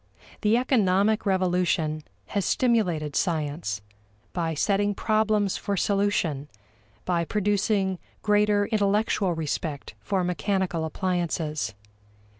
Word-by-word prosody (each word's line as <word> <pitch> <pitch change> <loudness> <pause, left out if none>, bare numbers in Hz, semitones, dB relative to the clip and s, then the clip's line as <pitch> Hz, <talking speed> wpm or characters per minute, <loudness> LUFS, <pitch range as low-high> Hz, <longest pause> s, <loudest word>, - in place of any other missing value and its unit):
The 215 +2 +3
economic 215 -4 +2
revolution 180 -4 +1 0.3
has 200 -2 0
stimulated 180 - +1
science 150 - -1 0.5
by 165 -2 -1
setting 205 +5 +1
problems 215 -2 +1
for 200 -1 -2
solution, 180 -8 0 0.6
by 175 -2 +1
producing 200 -1 0 0.2
greater 210 -1 +3
intellectual 205 -3 +1
respect 155 -2 -3
for 195 -3 -1
mechanical 180 -2 -1
appliances. 160 - -2
190 Hz, 90 wpm, -26 LUFS, 165-205 Hz, 0.6 s, The